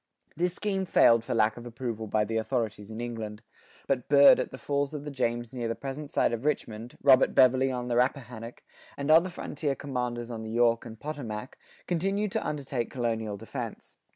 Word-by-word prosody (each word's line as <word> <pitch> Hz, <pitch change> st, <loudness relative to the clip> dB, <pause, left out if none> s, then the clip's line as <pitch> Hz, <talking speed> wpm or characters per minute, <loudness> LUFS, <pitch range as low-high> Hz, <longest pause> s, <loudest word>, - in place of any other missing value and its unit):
This 175 Hz, +2 st, 0 dB
scheme 195 Hz, -2 st, -1 dB
failed 115 Hz, -9 st, +5 dB
for 115 Hz, -, -2 dB
lack 110 Hz, 0 st, +2 dB
of 120 Hz, -, -9 dB
approval 115 Hz, -2 st, -5 dB
by 105 Hz, 0 st, +1 dB
the 110 Hz, +2 st, -2 dB
authorities 110 Hz, -3 st, -2 dB
in 110 Hz, +1 st, -7 dB
England.[84:3] 115 Hz, -2 st, -5 dB, 0.4 s
But 130 Hz, -3 st, -1 dB
Byrd 140 Hz, 0 st, +8 dB
at -, -, -1 dB
the -, -, -9 dB
falls 140 Hz, +1 st, -1 dB
of 145 Hz, -, -5 dB
the 150 Hz, -, -6 dB
James 120 Hz, -2 st, -2 dB
near 120 Hz, -2 st, -3 dB
the 115 Hz, -, -2 dB
present 140 Hz, +2 st, -6 dB
site -, -, +2 dB
of 115 Hz, +1 st, -3 dB
Richmond, 120 Hz, -6 st, -3 dB
Robert 135 Hz, -2 st, +6 dB
Beverley 130 Hz, 0 st, +5 dB
on 125 Hz, -1 st, -3 dB
the 120 Hz, -, 0 dB
Rappahannock, 125 Hz, -2 st, -2 dB, 0.3 s
and 140 Hz, +2 st, 0 dB
other 165 Hz, +4 st, +6 dB
frontier 150 Hz, -4 st, -3 dB
commanders 125 Hz, -4 st, -3 dB
on 115 Hz, -1 st, -5 dB
the 110 Hz, -, -6 dB
York 115 Hz, 0 st, +2 dB
and 110 Hz, -1 st, -10 dB
Potomac, 130 Hz, -6 st, -6 dB, 0.3 s
continued 195 Hz, +4 st, 0 dB
to -, -, -1 dB
undertake 135 Hz, -5 st, -3 dB
colonial 115 Hz, -4 st, -2 dB
defense. -, -, -7 dB
125 Hz, 190 wpm, -28 LUFS, 115-140 Hz, 0.4 s, Byrd